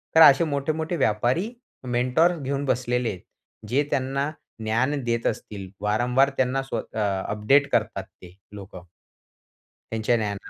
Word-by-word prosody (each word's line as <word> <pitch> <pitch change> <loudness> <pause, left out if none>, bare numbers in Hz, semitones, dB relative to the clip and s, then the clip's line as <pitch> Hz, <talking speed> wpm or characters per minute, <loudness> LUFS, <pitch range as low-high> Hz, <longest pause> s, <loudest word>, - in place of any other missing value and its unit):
तर 160 - +8
असे 145 +1 +8
मोठे-मोठे 155 +3 -1
व्यापारी 125 - +1 0.4
मेंटॉर्स 125 +8 +2
घेऊन 140 0 -2
बसलेले 125 -2 0
आहेत 90 -3 -6 0.5
जे 140 +4 +2
त्यांना 135 +2 0 0.3
ज्ञान 120 +7 +1
देत 115 -1 -1
असतील. 100 -4 -5
वारंवार 125 +6 +2
त्यांना 130 +1 +1
स्वत 135 - -6
अ, 100 -3 0
अपडेट 135 +7 +3
करतात 105 -3 0
ते 90 -1 -17 0.2
लोकं. 95 -3 -11 1.0
त्यांच्या 115 +1 +1
द्यान 105 -2 -2
125 Hz, 130 wpm, -25 LUFS, 105-140 Hz, 1.0 s, तर